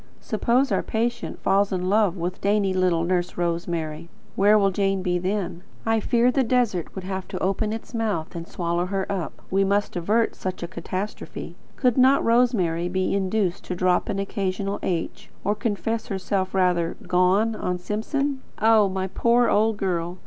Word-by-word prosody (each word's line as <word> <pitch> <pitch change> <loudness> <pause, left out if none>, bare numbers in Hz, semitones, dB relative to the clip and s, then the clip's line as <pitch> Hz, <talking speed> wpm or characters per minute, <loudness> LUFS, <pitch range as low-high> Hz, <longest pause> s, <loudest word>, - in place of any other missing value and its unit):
Suppose 240 +5 +1
our - - +2
patient 235 +1 -2
falls 195 +1 +3
in 180 -1 -1
love 200 -2 +2
with 180 +2 -4
dainty 200 -1 +2
little 180 -3 +2
Nurse 175 0 -1
Rosemary, 170 -2 -2 0.3
where 205 +2 +5
will 195 -1 +3
Jane 195 0 0
be 180 -1 +1
then? 185 -2 -2 0.2
I 225 0 +2
fear 235 +3 +3
the 270 - +2
desert 230 -8 0
would 190 - -5
have 190 0 -4
to - - -5
open 195 +3 0
its 225 +2 -6
mouth 210 -10 -2
and 170 0 -6
swallow 175 0 -1
her 195 0 -1
up. 185 -4 -4
We 195 +1 +3
must 200 +1 0
avert 210 +7 +1
such 185 -2 -5
a - - -3
catastrophe. 185 +4 -6 0.2
Could 250 -1 +2
not 265 +2 +5
Rosemary 205 -8 +2
be 185 +1 0
induced 195 -1 0
to 180 - -3
drop 180 +3 +1
an 200 - -1
occasional 195 0 -2
H, 170 -3 -3
or 205 - +2
to - - -12
confess 225 +1 -1
herself 190 0 -1
as - - -25
rather 180 -3 +1
"gone" 190 +5 +3
on 180 -3 -2
Simpson? 260 - -2 0.2
Oh, 220 -2 +5
my 190 0 -2
poor 235 +5 +2
old 220 0 +2
girl! 180 -3 -2
195 Hz, 180 wpm, -24 LUFS, 180-220 Hz, 0.3 s, where